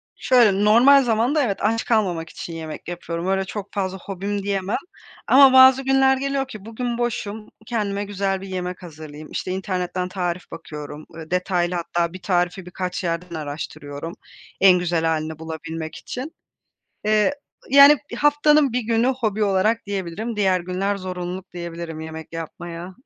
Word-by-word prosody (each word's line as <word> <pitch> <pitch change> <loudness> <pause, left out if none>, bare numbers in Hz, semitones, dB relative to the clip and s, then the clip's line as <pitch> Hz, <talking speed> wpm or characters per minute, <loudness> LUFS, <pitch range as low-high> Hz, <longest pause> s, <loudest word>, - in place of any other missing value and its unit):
Şöyle, 210 -6 +4
normal 260 +6 +7
zamanda, 245 +6 +2
evet, 200 -6 -1
aç 225 +2 +1
kalmamak 180 -8 0
için 170 - -8
yemek 160 -1 -7
yapıyorum. 170 0 -4
Öyle 190 0 +1
çok 200 0 -7
fazla 190 -2 -2
hobim 200 +2 -4
diyemem 195 0 -1 0.5
ama 270 0 +7
bazı 260 0 +8
günler 270 0 +4
geliyor 275 0 -1
ki 215 -6 -10
bugün 235 +1 -3
boşum, 220 -3 -3 0.2
kendime 205 -3 -2
güzel 195 -1 -2
bir 195 - -8
yemek 180 -1 -5
hazırlayayım, 155 -2 -10
işte, 185 - -3
internetten 185 -1 -2
tarif 180 -1 -3
bakıyorum, 150 -2 -8
ııı, 160 0 -10
detaylı 180 -1 0
hatta 170 0 -1
bir 185 - -9
tarifi 180 0 0
birkaç 180 +1 -4
yerden 170 0 -3
araştırıyorum 145 +1 -6 0.5
en 185 -2 +7
güzel 170 -2 0
hâlini 160 -1 -1
bulabilmek 160 0 -6
için. 265 +6 -7 0.7
Eee, 215 +5 +3 0.4
yani, 280 +2 +9 0.2
haftanın 295 -1 +4
1 250 - +1
günü 230 +1 +1
hobi 220 -5 0
olarak 205 +4 +1
diyebilirim. 200 +3 -4
Diğer 190 -3 +2
günler 185 +3 -2
zorunluluk 185 0 -6
diyebilirim 170 -2 -6
yemek 160 0 -8
yapmaya. 170 +2 -7
190 Hz, 150 wpm, -22 LUFS, 170-225 Hz, 0.7 s, yani